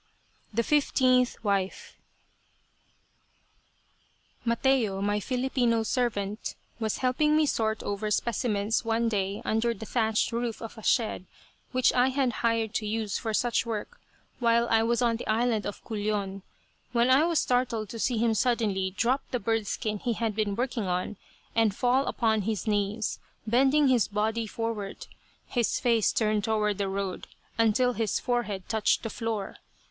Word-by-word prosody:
THE 230 Hz, +2 st, +1 dB
FIFTEENTH 255 Hz, -4 st, +2 dB
WIFE 195 Hz, -2 st, -1 dB, 2.5 s
Mateo, 235 Hz, -4 st, +1 dB
my 205 Hz, +1 st, 0 dB
Filipino 245 Hz, -1 st, 0 dB
servant, 215 Hz, -4 st, -2 dB, 0.2 s
was 220 Hz, -2 st, -1 dB
helping 300 Hz, +4 st, +3 dB
me 310 Hz, -, +4 dB
sort 220 Hz, -5 st, 0 dB
over 205 Hz, +1 st, -2 dB
specimens 215 Hz, -1 st, 0 dB
one 230 Hz, 0 st, +1 dB
day 200 Hz, -1 st, -2 dB
under 230 Hz, +2 st, +1 dB
the 220 Hz, -, -8 dB
thatched 220 Hz, 0 st, +1 dB
roof 235 Hz, -1 st, -2 dB
of 225 Hz, -, -8 dB
a 220 Hz, -, -10 dB
shed 215 Hz, -4 st, 0 dB, 0.4 s
which 255 Hz, 0 st, +3 dB
I 250 Hz, +1 st, +4 dB
had 265 Hz, -1 st, +1 dB
hired 230 Hz, -2 st, +1 dB
to 215 Hz, -1 st, -1 dB
use 215 Hz, -1 st, -2 dB
for 225 Hz, -, -3 dB
such 235 Hz, +2 st, +1 dB
work 230 Hz, -, -5 dB, 0.4 s
while 235 Hz, -1 st, +3 dB
I 225 Hz, 0 st, +5 dB
was 235 Hz, +2 st, +1 dB
on 230 Hz, -1 st, +2 dB
the -, -, -7 dB
island 220 Hz, -1 st, +1 dB
of 205 Hz, -, -7 dB
Culion, 205 Hz, -3 st, -2 dB, 0.5 s
when 240 Hz, +1 st, +3 dB
I 270 Hz, +4 st, +6 dB
was 335 Hz, -2 st, +1 dB
startled 245 Hz, -6 st, 0 dB
to 230 Hz, -, -7 dB
see 245 Hz, +1 st, 0 dB
him 225 Hz, 0 st, +2 dB
suddenly 205 Hz, -5 st, 0 dB
drop 255 Hz, +5 st, +2 dB
the 250 Hz, -, -1 dB
bird 225 Hz, 0 st, -1 dB
skin 210 Hz, 0 st, -2 dB
he 240 Hz, +2 st, -1 dB
had 225 Hz, -2 st, -2 dB
been 210 Hz, -2 st, 0 dB
working 240 Hz, -3 st, -2 dB
on, 180 Hz, +3 st, -2 dB, 0.4 s
and 225 Hz, -3 st, +2 dB
fall 255 Hz, +4 st, +2 dB
upon 220 Hz, -3 st, +1 dB
his 210 Hz, 0 st, -2 dB
knees, 210 Hz, 0 st, -1 dB, 0.3 s
bending 270 Hz, +6 st, +4 dB
his 250 Hz, -4 st, +3 dB
body 220 Hz, +2 st, -1 dB
forward, 220 Hz, -3 st, -4 dB, 0.4 s
his 240 Hz, -3 st, 0 dB
face 230 Hz, -4 st, +3 dB
turned 215 Hz, -2 st, +1 dB
toward 210 Hz, -2 st, 0 dB
the 200 Hz, -1 st, 0 dB
road, 195 Hz, -1 st, -3 dB, 0.3 s
until 230 Hz, +3 st, +3 dB
his 225 Hz, -3 st, -1 dB
forehead 225 Hz, -7 st, -2 dB
touched 220 Hz, -1 st, +1 dB
the 225 Hz, -, -3 dB
floor. 225 Hz, -4 st, -3 dB
225 Hz, 155 wpm, -28 LUFS, 210-245 Hz, 2.5 s, I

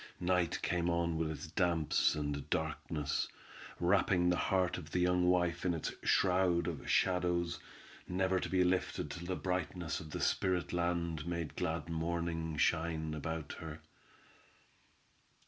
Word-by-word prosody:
Night 90 Hz, -1 st, +1 dB
came 85 Hz, -1 st, +1 dB
on 85 Hz, -1 st, +1 dB
with 80 Hz, -1 st, 0 dB
its 80 Hz, -, -5 dB
damps 85 Hz, -4 st, +2 dB
and 75 Hz, -1 st, -3 dB
darkness, 80 Hz, -3 st, -1 dB, 0.5 s
wrapping 90 Hz, 0 st, +3 dB
the 90 Hz, -, +3 dB
heart 95 Hz, -2 st, +2 dB
of 80 Hz, -3 st, -10 dB
the 90 Hz, -, -2 dB
young 90 Hz, 0 st, +3 dB
wife 90 Hz, -1 st, +2 dB
in 90 Hz, -2 st, +1 dB
its 80 Hz, -, -3 dB
shroud 90 Hz, -2 st, +3 dB
of 80 Hz, -6 st, -4 dB
shadows, 90 Hz, -2 st, +2 dB, 0.5 s
never 95 Hz, +1 st, +1 dB
to -, -, -3 dB
be 95 Hz, -1 st, +3 dB
lifted 90 Hz, +1 st, 0 dB
till 85 Hz, 0 st, -6 dB
the 95 Hz, -, -1 dB
brightness 90 Hz, -3 st, -2 dB
of 80 Hz, -, -9 dB
the -, -, -4 dB
spirit 90 Hz, -2 st, +1 dB
land 85 Hz, -2 st, -1 dB
made 85 Hz, -3 st, -3 dB
glad 80 Hz, +1 st, -2 dB
morning 80 Hz, -1 st, -2 dB
shine 80 Hz, 0 st, +1 dB
about 80 Hz, 0 st, -4 dB
her. 80 Hz, -2 st, -7 dB
85 Hz, 145 wpm, -34 LUFS, 80-90 Hz, 0.5 s, wrapping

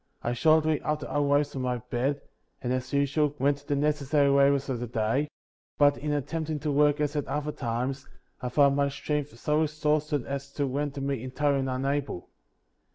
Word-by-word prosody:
48. 120 Hz, -, 0 dB
I -, -, 0 dB
shortly 155 Hz, +3 st, +3 dB
after 150 Hz, -1 st, -2 dB
arose 145 Hz, 0 st, +2 dB
from 135 Hz, -, -3 dB
my 125 Hz, -1 st, 0 dB
bed, 125 Hz, +4 st, -2 dB, 0.4 s
and, 125 Hz, 0 st, -2 dB
as 130 Hz, 0 st, -3 dB
usual, 140 Hz, +1 st, +1 dB
went 140 Hz, +2 st, +2 dB
to 145 Hz, -, -20 dB
the 145 Hz, -, +1 dB
necessary 145 Hz, 0 st, +2 dB
labors 140 Hz, 0 st, +4 dB
of 130 Hz, -3 st, -2 dB
the 120 Hz, -, -4 dB
day; 115 Hz, +6 st, 0 dB, 0.5 s
but, 145 Hz, -1 st, +5 dB
in 150 Hz, +1 st, -3 dB
attempting 155 Hz, +2 st, -2 dB
to 150 Hz, 0 st, -1 dB
work 145 Hz, +1 st, +3 dB
as 150 Hz, 0 st, 0 dB
at 145 Hz, -, -1 dB
other 150 Hz, 0 st, -2 dB
times, 130 Hz, +2 st, -3 dB, 0.3 s
I 125 Hz, -, -2 dB
found 140 Hz, +1 st, +4 dB
my 140 Hz, 0 st, +2 dB
strength 145 Hz, -2 st, -3 dB
so 150 Hz, +5 st, +1 dB
exhausted 150 Hz, -2 st, 0 dB
as 140 Hz, 0 st, -5 dB
to 145 Hz, -, 0 dB
render 140 Hz, +1 st, -2 dB
me 135 Hz, -3 st, -2 dB
entirely 135 Hz, +1 st, 0 dB
unable. 135 Hz, -5 st, -2 dB
140 Hz, 185 wpm, -28 LUFS, 135-150 Hz, 0.5 s, but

